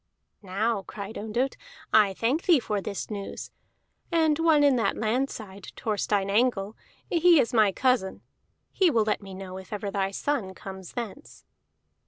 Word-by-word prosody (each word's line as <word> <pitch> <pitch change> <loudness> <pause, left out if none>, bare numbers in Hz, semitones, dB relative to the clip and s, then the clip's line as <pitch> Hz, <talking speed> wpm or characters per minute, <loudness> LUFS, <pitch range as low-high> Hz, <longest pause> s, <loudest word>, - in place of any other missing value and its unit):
"Now," 205 +2 -1
cried 200 +2 -8
Ondott, 235 +5 -2 0.4
"I 205 -3 +5
thank 255 - 0
thee 340 -6 +6
for 210 -4 -2
this 200 +2 -5
news. 200 -2 -6 0.6
And 320 -2 +3
one 320 -3 +4
in 280 -2 +5
that 230 - 0
land 245 +5 0
side, 200 -3 -9
Thorstein 205 -2 0
Angle, 210 -1 +1 0.3
he 340 -1 +5
is 245 -1 +1
my 215 -4 +5
cousin; 245 -4 0 0.5
he 375 -3 +3
will 230 -8 +3
let 215 0 -1
me 195 -1 -9
know 190 -1 -7
if 190 - -13
ever 205 -1 -3
thy 195 -1 0
son 200 -2 -2
comes 190 -2 -9
thence." 240 +4 -7
215 Hz, 160 wpm, -27 LUFS, 195-260 Hz, 0.6 s, thee